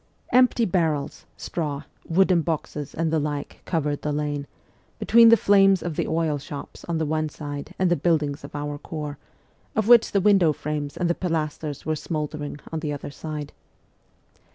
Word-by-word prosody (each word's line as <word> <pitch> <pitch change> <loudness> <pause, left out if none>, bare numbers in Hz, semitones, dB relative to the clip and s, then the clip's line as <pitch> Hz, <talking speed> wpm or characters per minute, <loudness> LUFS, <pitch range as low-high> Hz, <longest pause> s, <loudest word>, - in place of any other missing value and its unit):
Empty 250 -1 +4
barrels, 160 -6 -1
straw, 150 -4 -3 0.3
wooden 180 0 +4
boxes, 155 -3 -4
and 165 0 0
the 160 - +3
like 145 -1 -4
covered 150 -4 -1
the 150 - -2
lane, 145 -1 -2 0.5
between 230 0 +6
the 230 - +7
flames 195 -2 +4
of 175 -3 -3
the - - -1
oil 160 -2 0
shops 145 0 -9
on 170 -1 -1
the 160 - 0
one 155 0 -1
side 145 -1 -7
and 185 -2 +2
the - - +5
buildings 150 -5 0
of 140 - -10
our 145 0 -4
Corps, 150 -3 -6 0.6
of 220 -1 +1
which 240 -1 +7
the 200 - +3
window 190 -5 +4
frames 150 -1 -4
and 180 - 0
the 170 - +2
pilasters 155 -4 -3
were 155 +1 0
smouldering, 150 -1 -4
on 160 - -2
the 155 -2 -3
other 145 0 -5
side. 150 -1 -6
155 Hz, 175 wpm, -24 LUFS, 145-175 Hz, 0.6 s, the